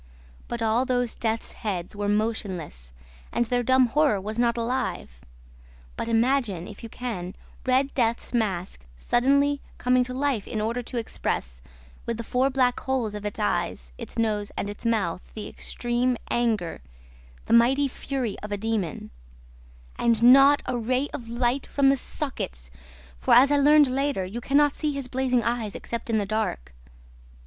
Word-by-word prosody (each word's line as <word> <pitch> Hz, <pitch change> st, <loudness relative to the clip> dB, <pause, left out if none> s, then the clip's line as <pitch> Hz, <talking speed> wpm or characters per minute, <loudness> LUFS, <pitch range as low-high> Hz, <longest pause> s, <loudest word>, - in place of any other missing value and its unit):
But 235 Hz, -1 st, -3 dB
all 225 Hz, +3 st, +2 dB
those 245 Hz, -2 st, 0 dB
death's 225 Hz, 0 st, -2 dB
heads 190 Hz, -3 st, -4 dB
were 205 Hz, 0 st, -2 dB
motionless 195 Hz, -, -2 dB, 0.4 s
and 240 Hz, -, +1 dB
their 245 Hz, +1 st, +1 dB
dumb 260 Hz, +1 st, +4 dB
horror 275 Hz, -3 st, +2 dB
was 215 Hz, +4 st, -5 dB
not 240 Hz, 0 st, +2 dB
alive. 230 Hz, -, -3 dB, 0.7 s
But -, -, -4 dB
imagine, 230 Hz, -6 st, +1 dB
if 205 Hz, -, -11 dB
you 230 Hz, -, -8 dB
can, 215 Hz, -8 st, -5 dB, 0.3 s
Red 265 Hz, +2 st, +2 dB
Death's 235 Hz, -1 st, 0 dB
mask 190 Hz, -, -1 dB
suddenly 280 Hz, -, +2 dB, 0.2 s
coming 250 Hz, 0 st, +3 dB
to 250 Hz, -, -6 dB
life 265 Hz, -6 st, -1 dB
in 220 Hz, -, -3 dB
order 230 Hz, +3 st, -1 dB
to 245 Hz, +1 st, -6 dB
express, 60 Hz, -, -3 dB, 0.5 s
with 230 Hz, -, -1 dB
the 230 Hz, -, -4 dB
four 255 Hz, +4 st, +1 dB
black 255 Hz, -2 st, +1 dB
holes 255 Hz, -5 st, -1 dB
of 210 Hz, 0 st, -4 dB
its 205 Hz, -, -6 dB
eyes, -, -, -2 dB
its -, -, -7 dB
nose, 210 Hz, -3 st, 0 dB
and 205 Hz, -, -2 dB
its 205 Hz, +3 st, -5 dB
mouth, 190 Hz, -7 st, 0 dB
the 215 Hz, -2 st, -5 dB
extreme 240 Hz, +1 st, -1 dB
anger, 220 Hz, -8 st, 0 dB, 0.6 s
the -, -, 0 dB
mighty 260 Hz, +5 st, +5 dB
fury 260 Hz, -5 st, -3 dB
of 210 Hz, -, -8 dB
a 205 Hz, -, -1 dB
demon; 210 Hz, -6 st, -3 dB, 0.9 s
AND 230 Hz, -1 st, +2 dB
NOT 275 Hz, +4 st, +7 dB
A 245 Hz, -, -2 dB
RAY 255 Hz, +5 st, 0 dB
OF 230 Hz, -3 st, -6 dB
LIGHT 240 Hz, +3 st, 0 dB
FROM 275 Hz, -1 st, +3 dB
THE 275 Hz, -, +3 dB
SOCKETS, -, -, -5 dB, 0.5 s
for, -, -, +4 dB
as 270 Hz, +3 st, +7 dB
I 290 Hz, -, +4 dB
learned 295 Hz, +1 st, +6 dB
later, 270 Hz, -5 st, -1 dB
you 215 Hz, +6 st, -6 dB
can 275 Hz, +4 st, +1 dB
not 290 Hz, -1 st, +4 dB
see 300 Hz, -2 st, -2 dB
his 275 Hz, -2 st, -4 dB
blazing 255 Hz, -1 st, +1 dB
eyes 230 Hz, -3 st, -2 dB
except 235 Hz, 0 st, -5 dB
in 225 Hz, -, +2 dB
the 205 Hz, -, 0 dB
dark. 195 Hz, -, -2 dB
235 Hz, 170 wpm, -25 LUFS, 210-260 Hz, 0.9 s, NOT